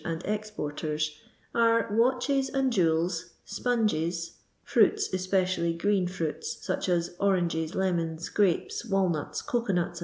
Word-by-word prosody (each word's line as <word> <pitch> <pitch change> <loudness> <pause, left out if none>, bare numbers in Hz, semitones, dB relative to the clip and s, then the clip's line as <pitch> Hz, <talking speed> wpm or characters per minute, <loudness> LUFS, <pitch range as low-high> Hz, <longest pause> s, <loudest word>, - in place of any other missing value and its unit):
and 165 0 -4
exporters, 155 -7 -3 0.3
are, 230 0 +3
watdMi 255 +4 +2
and 265 -2 +2
jewels, 165 -2 +1
sponges 185 -7 -1
— - - -39
^fruits, 420 -1 +3
especially 185 -2 +1
green 195 +1 +1
fruits, 170 -4 -3
such - - -1
ai 175 -1 +4 0.2
oranges, 175 -4 +1
lemons, 170 -3 -1
grapes, 200 0 +1
walnuts, 190 -8 0
cocoarnuts, 200 -8 -1
&c. - - -5
185 Hz, 120 wpm, -28 LUFS, 165-215 Hz, 0.3 s, ai